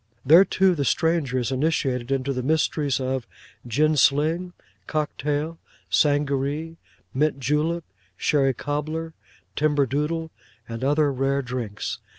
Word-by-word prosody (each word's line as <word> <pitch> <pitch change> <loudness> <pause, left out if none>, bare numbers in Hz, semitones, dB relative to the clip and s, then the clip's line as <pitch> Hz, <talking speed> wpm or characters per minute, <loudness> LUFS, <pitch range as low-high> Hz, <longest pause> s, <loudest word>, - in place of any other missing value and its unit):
There 165 +8 +8
too 190 -1 +3
the 145 -4 -1
stranger 145 0 +1
is 125 0 -1
initiated 130 -3 0
into 135 0 0
the 130 - -2
mysteries 150 -1 +1
of 130 -2 -2 0.4
Gin 155 +6 +2
sling, 155 +6 +2 0.3
Cock 155 -1 -2
tail, 150 +3 -2 0.3
Sangaree, 145 +2 +1 0.4
Mint 145 +1 +1
Julep, 150 +6 0 0.3
Sherry 135 -4 +2
cobbler, 155 +4 -3 0.4
Timber 145 -2 +2
Doodle, 155 +5 -2 0.4
and 115 +1 -6
other 145 +1 +2
rare 135 +1 0
drinks. 125 -5 -4
145 Hz, 125 wpm, -24 LUFS, 135-155 Hz, 0.4 s, There